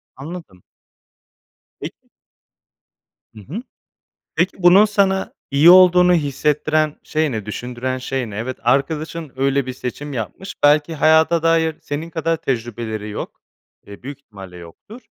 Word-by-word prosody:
Anladım. 145 - -10 1.2
Peki. - - -10 1.2
Hı 110 - -13
hı. 175 - -7 0.7
Peki, 180 +2 0
bunun 190 +4 +7
sana 195 -2 0 0.2
iyi 145 +5 +6
olduğunu 180 -1 +7
hissettiren 150 0 0
şey 155 -2 -1
ne? 110 -3 -4
Düşündüren 125 +4 -4
şey 130 -2 -4
ne? 100 - -9
Evet, 125 +3 -4
arkadaşın 150 +4 -1
öyle 135 0 0
bir 130 - -5
seçim 140 +3 -6
yapmış. 130 - -6
Belki 150 +2 +3
hayata 160 +2 +3
dair 165 -1 +2
senin 155 +3 -5
kadar 165 0 -1
tecrübeleri 115 -4 -4
yok. 105 - -7 0.5
Eee, 100 +3 -12
büyük 140 +1 -8
ihtimalle 95 -8 -13
yoktur. 90 - -13
145 Hz, 125 wpm, -19 LUFS, 125-165 Hz, 1.2 s, bunun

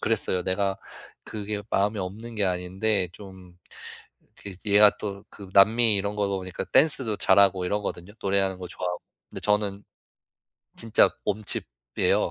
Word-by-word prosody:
그랬어요. 100 -4 -1
내가 95 +1 -1 0.5
그게 105 -1 -5
마음에 105 +2 +1
없는 110 +5 -6
게 105 - +1
아닌데 95 +2 -1
좀 95 -3 -14 0.8
그 100 - -7
얘가 105 0 +7
또 100 -1 -6
그 100 - -12
남미 110 +3 +5
이런 100 +1 -2
거다 100 -1 +1
보니까 95 -1 -5
댄스도 135 -8 +2
잘하고 95 -1 +3
이러거든요, 100 -1 -4
노래하는 95 -1 +1
거 90 -1 -7
좋아하고. 90 0 -4 0.3
근데 - - -7
저는 105 -1 0 0.9
진짜 115 0 +3 0.2
몸치예요. - - -1
100 Hz, 300 characters per minute, -25 LUFS, 95-105 Hz, 0.9 s, 얘가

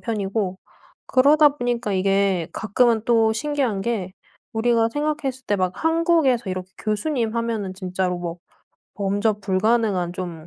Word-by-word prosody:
편이고 200 -3 -2 0.5
그러다 295 +3 +5
보니까 240 -4 -1
이게 195 -2 +1
가끔은 225 +1 +2
또 225 -2 +3
신기한 270 -6 -1
게 195 -5 -2 0.4
우리가 230 0 +2
생각했을 295 -3 -2
때 205 - +1
막 185 -1 0
한국에서 325 - +2
이렇게 185 0 -5
교수님 225 +2 -1
하면은 225 -5 -2
진짜로 185 -1 -2
뭐 170 -1 -5 0.6
범접 205 +2 0
불가능한 195 -2 +1
좀 170 -3 -6
220 Hz, 300 characters per minute, -22 LUFS, 190-245 Hz, 0.6 s, 그러다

